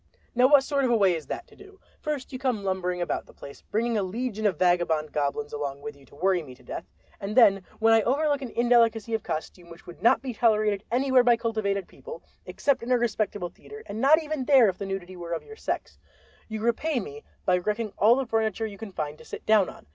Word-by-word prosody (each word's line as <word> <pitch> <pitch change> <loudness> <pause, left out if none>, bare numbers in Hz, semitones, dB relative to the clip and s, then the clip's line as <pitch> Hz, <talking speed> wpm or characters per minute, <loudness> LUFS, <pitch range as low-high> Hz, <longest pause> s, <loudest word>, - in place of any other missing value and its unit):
"Now 250 +1 +5
what 285 -1 +6
sort 280 0 0
of 255 - +2
a 240 - +4
way 195 -4 +4
is 160 -2 -5
that - - -5
to - - -20
do? 400 -1 -16 0.2
First 295 -3 -4
you 255 - -5
come 250 -6 -1
lumbering 180 -2 -2
about - - -3
the - - -18
place 140 - -11
bringing 230 +1 -1
a - - +1
legion 220 +2 -2
of 185 -6 -1
vagabond 170 -4 +1
goblins 145 0 -2
along 140 -1 -4
with 150 0 -6
you 140 -2 -20
to - - -18
worry 185 +3 +1
me 130 -5 -11
to 125 - -21
death, - - -7 0.3
and 200 +3 -5
then 195 -6 +6
when 225 0 +4
I 225 - +5
overlook 285 +5 +1
an 260 - -5
indelicacy 230 -1 +2
of 220 - 0
costume 170 +2 -6
which 170 0 -14
would 175 - -12
not 235 - +4
be 260 -2 -4
tolerated 215 -3 +2
anywhere 260 +1 +4
by 240 -1 +4
cultivated 215 -4 -2
people 475 0 -11 0.2
except 280 - 0
in 235 +2 -4
a 250 - +5
respectable 215 -5 -1
theater, 435 - -13
and 215 +2 -5
not 295 +4 +6
even 300 -4 -3
there 260 -6 +6
if 185 - -5
the 200 - -4
nudity 190 -1 -5
were 170 -1 -6
of 165 - -3
your 440 - -12
sex, - - -4 0.5
you 220 -1 -5
repay 250 +5 0
me 145 -8 -8 0.2
by 180 -1 +3
wrecking 210 +3 -2
all 220 +4 +6
the 270 0 -1
furniture 225 -1 -1
you 205 -2 -8
can 220 -3 -7
find 150 -3 -5
to - - -13
sit - - -9
down 215 -3 +4
on. - - -13
215 Hz, 240 wpm, -26 LUFS, 180-245 Hz, 0.5 s, what